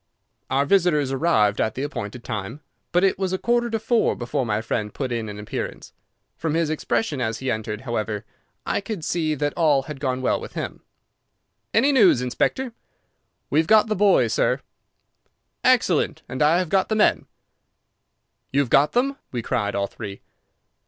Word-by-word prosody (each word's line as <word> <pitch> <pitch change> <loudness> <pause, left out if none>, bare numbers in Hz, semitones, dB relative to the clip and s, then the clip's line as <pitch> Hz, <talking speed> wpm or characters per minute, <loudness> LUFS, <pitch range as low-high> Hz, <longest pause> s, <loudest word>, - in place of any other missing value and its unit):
Our 135 +2 +2
visitors 150 -5 +2
arrived 120 -9 +2
at 110 - 0
the 130 - -3
appointed 120 -4 -5
time, 110 +5 -5 0.3
but 180 +1 +3
it 195 -1 +2
was 190 -1 -1
a - - +1
quarter 240 +3 +1
to 225 - 0
four 225 +1 +1
before 120 +1 -2
my 105 -1 0
friend 110 -1 -2
put 130 +1 -4
in 115 -2 -2
an 105 - -7
appearance. 105 0 -6 0.4
From 160 -1 -1
his 165 -2 +1
expression 155 - -1
as 110 -1 -1
he 130 +1 -2
entered, 110 -1 -3
however, 110 -4 -3 0.4
I - - 0
could 195 -5 -5
see 160 -3 0
that 145 0 -1
all 150 -5 +3
had 150 -1 -8
gone 130 -2 -2
well - - +1
with - - -9
him. - - -5 0.9
"Any 265 +6 +4
news, 210 - +5
Inspector?" 225 - -1 0.8
"We 150 - +4
have 160 - +1
got 220 +1 +5
the 215 - +1
boy, 195 -10 +4
sir." - - +1 1.0
"Excellent, - - +2
and 130 - -5
I 155 +3 +5
have 180 -2 -1
got 190 +1 +2
the 220 - +1
men." 215 - +2 1.2
"You 140 - +3
have 130 -4 -3
got 145 +2 +4
them!" 270 +3 +1
we 120 -2 -3
cried, 105 -5 -1
all 100 - +1
three. 100 -1 -8
145 Hz, 180 wpm, -23 LUFS, 115-185 Hz, 1.2 s, news